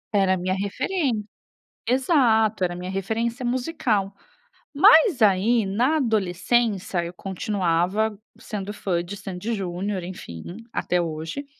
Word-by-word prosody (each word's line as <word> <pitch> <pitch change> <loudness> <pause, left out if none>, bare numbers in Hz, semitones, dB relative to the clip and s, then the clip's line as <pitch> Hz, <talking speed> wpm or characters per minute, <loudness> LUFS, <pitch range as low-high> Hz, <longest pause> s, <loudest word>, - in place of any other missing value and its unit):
Era 195 -2 +4
a - - -3
minha 185 +1 -1
referen 215 - -1 0.6
exato, 235 - +3
era 175 - 0
a 175 - -6
minha 180 +1 -5
referência 225 +6 -2
musical. 240 - -1 0.6
Mas 380 - +6
aí, 215 +3 +4
na 240 +11 +1
adolescência, 210 - 0
eu 170 +1 -6
continuava 190 +2 0 0.2
sendo 205 -1 -6
fã 175 -4 -1
de 180 +4 -7
Sandy 195 +3 -5
e - - +1
Junior, 190 0 -3
enfim, 85 - -8 0.3
até 180 - 0
hoje. 165 - -4
200 Hz, 130 wpm, -24 LUFS, 185-235 Hz, 0.6 s, Mas